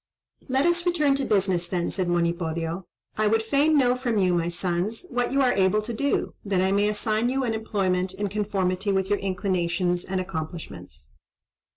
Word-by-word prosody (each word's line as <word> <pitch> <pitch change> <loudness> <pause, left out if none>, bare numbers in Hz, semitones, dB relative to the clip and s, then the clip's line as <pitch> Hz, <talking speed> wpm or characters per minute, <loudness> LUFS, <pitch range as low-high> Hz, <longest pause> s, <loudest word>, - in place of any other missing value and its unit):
"Let 265 +2 +2
us 345 +1 +1
return 305 -5 +3
to 275 - -1
business, 190 -4 +1
then," 175 -2 -1
said 185 -2 -1
Monipodio. 170 0 -1 0.3
"I 215 - +3
would 225 +1 +2
fain 285 +6 +3
know 250 -3 +4
from 245 -3 -1
you, 185 -3 +3
my 170 -1 +1
sons, 180 - -2
what 245 0 0
you 275 +1 +2
are 250 - +3
able 195 +2 +2
to 235 +2 -4
do, 280 +5 -1
that 195 -3 0
I 190 +1 +2
may 205 +1 +3
assign 215 +2 0
you 265 +1 0
an 235 -3 0
employment 190 -4 -1
in 205 +1 -2
conformity 195 -1 -1
with 190 0 0
your 205 - +2
inclinations 180 -2 -1
and 190 0 -2
accomplishments." 155 - -7
195 Hz, 185 wpm, -25 LUFS, 180-225 Hz, 0.3 s, know